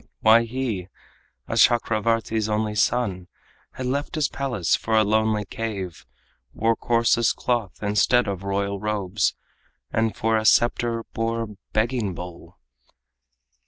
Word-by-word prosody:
Why 115 Hz, +2 st, +6 dB
he, 115 Hz, -7 st, -3 dB, 0.6 s
a -, -, -3 dB
Chakravartin's 115 Hz, -1 st, +2 dB
only 105 Hz, 0 st, 0 dB
son, 105 Hz, -4 st, 0 dB, 0.5 s
Had 130 Hz, -, -5 dB
left 140 Hz, +5 st, -2 dB
his 155 Hz, -3 st, +1 dB
palace 120 Hz, -, 0 dB
for 110 Hz, -, -1 dB
a 110 Hz, -, +5 dB
lonely 110 Hz, 0 st, +1 dB
cave, 95 Hz, -, -5 dB, 0.5 s
Wore 115 Hz, +1 st, +2 dB
coarsest 115 Hz, 0 st, +2 dB
cloth 120 Hz, -6 st, -2 dB
instead 105 Hz, +4 st, +3 dB
of 95 Hz, -2 st, -3 dB
royal 100 Hz, 0 st, -2 dB
robes, 105 Hz, -2 st, -1 dB, 0.6 s
And 110 Hz, 0 st, 0 dB
for 110 Hz, 0 st, +1 dB
a 110 Hz, -, -2 dB
scepter 120 Hz, 0 st, +3 dB
bore 115 Hz, 0 st, -1 dB
a -, -, -6 dB, 0.3 s
begging 110 Hz, -4 st, 0 dB
bowl? 90 Hz, 0 st, -10 dB
110 Hz, 125 wpm, -24 LUFS, 100-115 Hz, 0.6 s, Why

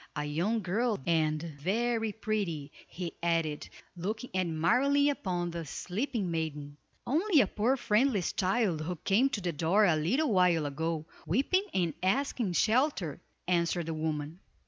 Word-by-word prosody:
A 150 Hz, 0 st, -2 dB
young 185 Hz, +10 st, 0 dB
girl, 215 Hz, +5 st, 0 dB
and 155 Hz, -2 st, +2 dB, 0.2 s
very 225 Hz, +6 st, 0 dB
pretty," 200 Hz, -9 st, -3 dB, 0.2 s
he 175 Hz, -2 st, -6 dB
added, 165 Hz, -3 st, 0 dB, 0.3 s
looking 215 Hz, +7 st, -4 dB
admiringly 235 Hz, -, +2 dB
upon 175 Hz, -9 st, -2 dB
the 170 Hz, 0 st, -4 dB
sleeping 195 Hz, -, -3 dB
maiden. 150 Hz, -3 st, -3 dB, 0.3 s
"Only 325 Hz, -, +3 dB
a -, -, +3 dB
poor 230 Hz, +7 st, +1 dB
friendless 220 Hz, -, +1 dB
child, 190 Hz, -4 st, +1 dB
who 175 Hz, +3 st, -3 dB
came 205 Hz, -, +2 dB
to 220 Hz, -7 st, -3 dB
the 175 Hz, -2 st, -2 dB
door 170 Hz, +8 st, +3 dB
a 170 Hz, -5 st, +4 dB
little 225 Hz, -, +1 dB
while 180 Hz, -4 st, +3 dB
ago, 155 Hz, +2 st, -2 dB, 0.2 s
weeping 280 Hz, -, +2 dB
and 175 Hz, -4 st, 0 dB
asking 230 Hz, 0 st, 0 dB
shelter," 220 Hz, -, +1 dB, 0.3 s
answered 170 Hz, -1 st, +1 dB
the 165 Hz, -, -3 dB
woman. 155 Hz, +1 st, -3 dB
180 Hz, 145 wpm, -30 LUFS, 160-230 Hz, 0.3 s, a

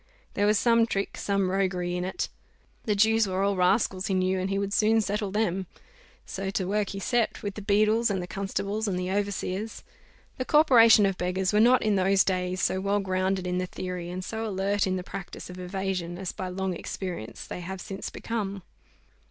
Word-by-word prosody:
There 205 Hz, 0 st, +2 dB
was 210 Hz, 0 st, +4 dB
some 230 Hz, 0 st, +4 dB
trick, 195 Hz, -3 st, -2 dB
some 200 Hz, -2 st, 0 dB
roguery 180 Hz, -2 st, 0 dB
in 180 Hz, -, -2 dB
it. 185 Hz, -, -2 dB, 0.6 s
The 210 Hz, -, +1 dB
Jews 220 Hz, +1 st, +4 dB
were 190 Hz, +1 st, -1 dB
all 200 Hz, 0 st, +2 dB
rascals, 185 Hz, 0 st, +2 dB
he 195 Hz, -, 0 dB
knew, 185 Hz, 0 st, +1 dB
and 185 Hz, +1 st, -2 dB
he 195 Hz, -, 0 dB
would 200 Hz, 0 st, -2 dB
soon 220 Hz, +1 st, +4 dB
settle 205 Hz, -1 st, -1 dB
them. 190 Hz, -3 st, -1 dB, 0.6 s
So 195 Hz, 0 st, -4 dB
to 190 Hz, -1 st, -2 dB
work 205 Hz, 0 st, 0 dB
he 195 Hz, -, -5 dB
set 235 Hz, +3 st, 0 dB
with 205 Hz, -1 st, -3 dB
the 210 Hz, -, -7 dB
beadles, 215 Hz, +3 st, +3 dB
and 195 Hz, -2 st, 0 dB
the 180 Hz, -, -4 dB
constables, 200 Hz, +3 st, -3 dB
and 190 Hz, -3 st, -1 dB
the 180 Hz, 0 st, -2 dB
overseers. 200 Hz, +1 st, -2 dB, 0.6 s
The 255 Hz, -, -1 dB
corporation 235 Hz, -9 st, +6 dB
of 195 Hz, -1 st, -1 dB
beggars 185 Hz, +2 st, 0 dB
were 210 Hz, -, +4 dB
not, 245 Hz, +3 st, +5 dB
in 210 Hz, -2 st, +2 dB
those 190 Hz, +1 st, +4 dB
days, 185 Hz, -1 st, -1 dB
so 190 Hz, +2 st, +1 dB
well 200 Hz, +1 st, +1 dB
grounded 185 Hz, -1 st, -1 dB
in 180 Hz, 0 st, -1 dB
the 185 Hz, -, -2 dB
theory 180 Hz, -1 st, -5 dB
and 185 Hz, +1 st, -5 dB
so 220 Hz, 0 st, -4 dB
alert 200 Hz, -1 st, 0 dB
in 185 Hz, -, 0 dB
the 180 Hz, -, -3 dB
practice 180 Hz, -1 st, -8 dB
of 180 Hz, -, -9 dB
evasion 180 Hz, -2 st, -3 dB
as, 190 Hz, -1 st, -4 dB
by 185 Hz, -, -5 dB
long 185 Hz, 0 st, -2 dB
experience, 175 Hz, -, -6 dB
they -, -, -6 dB
have 190 Hz, +2 st, -6 dB
since 195 Hz, +2 st, -6 dB
become. 200 Hz, -4 st, -4 dB
195 Hz, 205 wpm, -27 LUFS, 185-210 Hz, 0.6 s, corporation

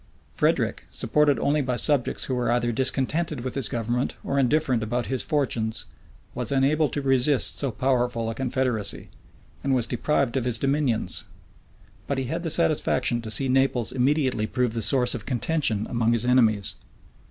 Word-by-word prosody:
Frederick, -, -, 0 dB
supported 150 Hz, -2 st, +1 dB
only 145 Hz, +1 st, +1 dB
by 130 Hz, -2 st, -2 dB
subjects 140 Hz, 0 st, 0 dB
who 130 Hz, -, -2 dB
were 125 Hz, -1 st, 0 dB
either 120 Hz, 0 st, +1 dB
discontented 135 Hz, +4 st, 0 dB
with 130 Hz, 0 st, -5 dB
his 135 Hz, -4 st, -1 dB
government 120 Hz, +2 st, -2 dB
or 140 Hz, -, -1 dB
indifferent 130 Hz, -2 st, +1 dB
about 120 Hz, +2 st, -2 dB
his 130 Hz, -2 st, -2 dB
fortunes, 120 Hz, -7 st, -2 dB, 0.5 s
was -, -, -3 dB
unable 140 Hz, +3 st, +2 dB
to 145 Hz, -, -4 dB
resist 135 Hz, +1 st, +3 dB
so 140 Hz, -, 0 dB
powerful 120 Hz, -2 st, 0 dB
a 115 Hz, -, -2 dB
confederacy, 125 Hz, -3 st, -2 dB, 0.5 s
and 135 Hz, -1 st, +1 dB
was 120 Hz, -3 st, +1 dB
deprived 130 Hz, +1 st, -1 dB
of 130 Hz, -, 0 dB
his 120 Hz, -2 st, +1 dB
dominions: 135 Hz, -, -1 dB, 0.8 s
but 140 Hz, -, -2 dB
he 135 Hz, -, -1 dB
had 160 Hz, +7 st, -3 dB
the 165 Hz, -, -3 dB
satisfaction 155 Hz, -6 st, +2 dB
to 110 Hz, -, -7 dB
see 110 Hz, +6 st, +3 dB
Naples 130 Hz, -4 st, +1 dB
immediately 130 Hz, -4 st, 0 dB
prove 125 Hz, -1 st, -1 dB
the 115 Hz, -, -2 dB
source 125 Hz, +3 st, +2 dB
of 115 Hz, -3 st, -6 dB
contention 125 Hz, -4 st, 0 dB
among 115 Hz, -1 st, +1 dB
his 115 Hz, 0 st, +1 dB
enemies. 110 Hz, -5 st, +3 dB
125 Hz, 165 wpm, -25 LUFS, 120-140 Hz, 0.8 s, resist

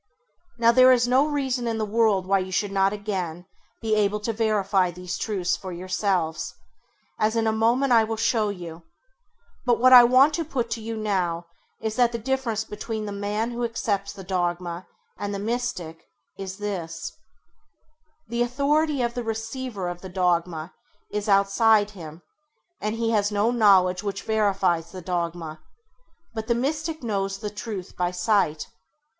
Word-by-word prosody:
Now 230 Hz, -1 st, +5 dB
there 255 Hz, +1 st, +7 dB
is 245 Hz, -1 st, +4 dB
no 260 Hz, +4 st, +4 dB
reason 265 Hz, -5 st, -1 dB
in 225 Hz, -1 st, -1 dB
the 220 Hz, -, -1 dB
world 210 Hz, -3 st, +2 dB
why 195 Hz, +1 st, +3 dB
you 185 Hz, 0 st, -4 dB
should 200 Hz, +2 st, 0 dB
not 195 Hz, 0 st, +2 dB
again 185 Hz, -5 st, -4 dB, 0.4 s
be 220 Hz, -1 st, 0 dB
able 210 Hz, 0 st, +2 dB
to 225 Hz, +2 st, -2 dB
verify 205 Hz, -4 st, +1 dB
these 180 Hz, 0 st, -6 dB
truths 190 Hz, -5 st, -1 dB
for 185 Hz, -, -7 dB
yourselves, 185 Hz, -2 st, -1 dB, 0.6 s
as 220 Hz, +1 st, +1 dB
in 225 Hz, -1 st, +1 dB
a 220 Hz, -, +3 dB
moment 240 Hz, +4 st, +2 dB
I 225 Hz, -1 st, +6 dB
will 225 Hz, +1 st, -2 dB
show 225 Hz, -1 st, +1 dB
you; 175 Hz, -4 st, -7 dB, 0.8 s
but 245 Hz, -2 st, +2 dB
what 255 Hz, +1 st, +6 dB
I 245 Hz, -1 st, +11 dB
want 260 Hz, +5 st, +5 dB
to 335 Hz, -, -1 dB
put 255 Hz, -6 st, -3 dB
to 225 Hz, -, -2 dB
you 225 Hz, 0 st, -5 dB
now 180 Hz, -5 st, -1 dB, 0.3 s
is 220 Hz, 0 st, -3 dB
that 240 Hz, -1 st, +3 dB
the -, -, -1 dB
difference 230 Hz, -2 st, -1 dB
between 215 Hz, +1 st, -5 dB
the 205 Hz, -, -5 dB
man 205 Hz, +3 st, -2 dB
who 240 Hz, 0 st, -3 dB
accepts 205 Hz, -4 st, -1 dB
the 195 Hz, -, -10 dB
dogma 175 Hz, -1 st, -2 dB, 0.3 s
and 205 Hz, 0 st, -3 dB
the -, -, -2 dB
Mystic 200 Hz, -7 st, -4 dB, 0.3 s
is 190 Hz, -1 st, -6 dB
this: 175 Hz, -6 st, -4 dB, 1.2 s
the 235 Hz, +1 st, -2 dB
authority 280 Hz, +3 st, +1 dB
of 235 Hz, 0 st, -1 dB
the 245 Hz, -, -3 dB
receiver 225 Hz, -2 st, -4 dB
of 175 Hz, 0 st, -5 dB
the 190 Hz, -, -8 dB
dogma 175 Hz, -3 st, 0 dB, 0.4 s
is 210 Hz, 0 st, -2 dB
outside 205 Hz, +2 st, +4 dB
him, 165 Hz, -4 st, -10 dB, 0.6 s
and 215 Hz, +1 st, -2 dB
he 230 Hz, 0 st, 0 dB
has 205 Hz, -2 st, +2 dB
no 210 Hz, +3 st, +2 dB
knowledge 190 Hz, -6 st, +4 dB
which 200 Hz, -2 st, -4 dB
verifies 195 Hz, -6 st, +1 dB
the 185 Hz, -, -8 dB
dogma; 170 Hz, -3 st, -3 dB, 0.7 s
but 220 Hz, -1 st, -5 dB
the 235 Hz, -, +2 dB
Mystic 310 Hz, +4 st, -2 dB
knows 195 Hz, -3 st, -1 dB
the 210 Hz, +1 st, -5 dB
truth 205 Hz, -3 st, -6 dB
by 180 Hz, -1 st, 0 dB
sight. 180 Hz, -4 st, +1 dB
210 Hz, 170 wpm, -25 LUFS, 185-230 Hz, 1.2 s, I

